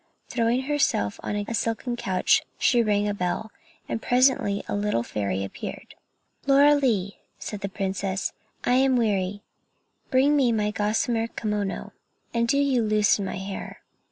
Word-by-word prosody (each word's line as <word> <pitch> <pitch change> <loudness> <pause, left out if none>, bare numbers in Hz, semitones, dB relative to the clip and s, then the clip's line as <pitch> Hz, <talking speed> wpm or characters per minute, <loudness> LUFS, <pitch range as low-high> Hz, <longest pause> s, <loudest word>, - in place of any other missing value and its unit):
Throwing 240 +2 +1
herself 275 - 0
down 210 - -3
on 205 0 -2
a - - -3
silken 230 +2 -1
couch, 190 -6 +2 0.2
she 240 -2 +3
rang 210 -2 +1
a 205 - 0
bell, 200 +3 -2 0.4
and 225 - -3
presently 245 -5 +2
a - - -20
pretty 205 - -3
little 205 - 0
fairy 100 -4 -2
appeared. 95 - -7 0.5
"Lorelei," 275 -8 +4 0.2
said 210 -2 -6
the 200 - -3
princess, 190 -1 -2 0.3
"I 245 - +2
am 265 0 +4
weary; 205 -4 0 0.7
bring 275 +3 +4
me 265 -4 +3
my 210 -1 0
gossamer 225 +2 0
kimono, 210 -3 -3 0.4
and 235 0 +1
do 280 - +2
you 275 -3 +2
loosen 210 -2 +2
my - - -4
hair. 195 0 -7
215 Hz, 155 wpm, -25 LUFS, 200-245 Hz, 0.7 s, Lorelei